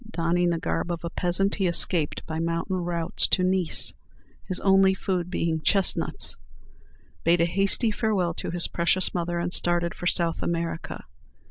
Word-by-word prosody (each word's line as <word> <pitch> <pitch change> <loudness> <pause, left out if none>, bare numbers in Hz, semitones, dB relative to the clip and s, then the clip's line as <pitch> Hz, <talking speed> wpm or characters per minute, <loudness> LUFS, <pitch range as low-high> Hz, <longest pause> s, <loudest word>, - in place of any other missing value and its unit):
Donning 175 -2 0
the 170 - 0
garb 175 +1 -2
of 170 -1 -5
a 170 - -4
peasant, 190 +3 0
he 195 -3 0
escaped 170 -2 +2
by 160 0 -4
mountain 170 +3 -2
routes 170 -2 0
to 185 - +2
Nice, 185 -2 +1 0.5
his 185 - -1
only 195 -1 +4
food 180 -3 -2
being 165 -3 -1
chestnuts, 195 +3 +1 0.9
bade 170 +1 +3
a 170 - +4
hasty 195 +6 +1
farewell 205 -6 0
to - - -5
his 175 0 0
precious 175 +2 0
mother, 175 -1 -2
and 175 +1 -2
started 175 0 +1
for 175 - -5
South 170 -2 +1
America. 165 -1 -3
175 Hz, 160 wpm, -25 LUFS, 170-185 Hz, 0.9 s, only